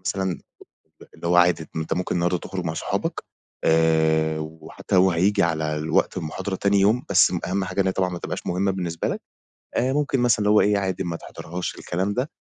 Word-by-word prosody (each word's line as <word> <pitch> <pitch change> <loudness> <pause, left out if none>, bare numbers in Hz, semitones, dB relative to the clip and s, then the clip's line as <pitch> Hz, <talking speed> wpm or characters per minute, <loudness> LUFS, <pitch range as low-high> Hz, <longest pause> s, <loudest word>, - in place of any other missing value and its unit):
مثلًا 95 -3 -2 0.8
اللي 85 - -5
هو 90 - +3
عادي 90 -2 +4
أنت 80 0 -2
ممكن 90 +2 -2
النهارده 90 +1 +1
تخرج 95 +1 -5
مع 80 - -1
أصحابك - - -3 0.4
آآ 80 -1 +3
وحتى 80 +4 -5
لو 95 0 +5
هييجي 100 +4 +2
على 80 -2 0
الوقت 80 +4 0
المحاضرة 90 +3 -4
تاني 100 +1 +2
يوم، 105 +6 +3
بس 95 -1 +5
أهم 95 +2 -1
حاجة 95 +1 -1
إن 95 - 0
هي 95 - +2
طبعًا 95 -1 0
ما 90 - -5
تبقاش - - -5
مهمة 95 +2 +1
بالنسبة 85 -3 -3
لك - - -3 0.6
آآ 130 +2 +1
ممكن 145 -2 0
مثلًا 120 -3 +3
اللي 105 -1 +2
هو 105 - +6
إيه 105 0 +3
عادي 95 -1 -2
ما 85 -1 -3
تحضرهاش 85 +2 -6
الكلام 95 +4 -2
ده 130 +7 -2
90 Hz, 200 wpm, -23 LUFS, 80-100 Hz, 0.8 s, هو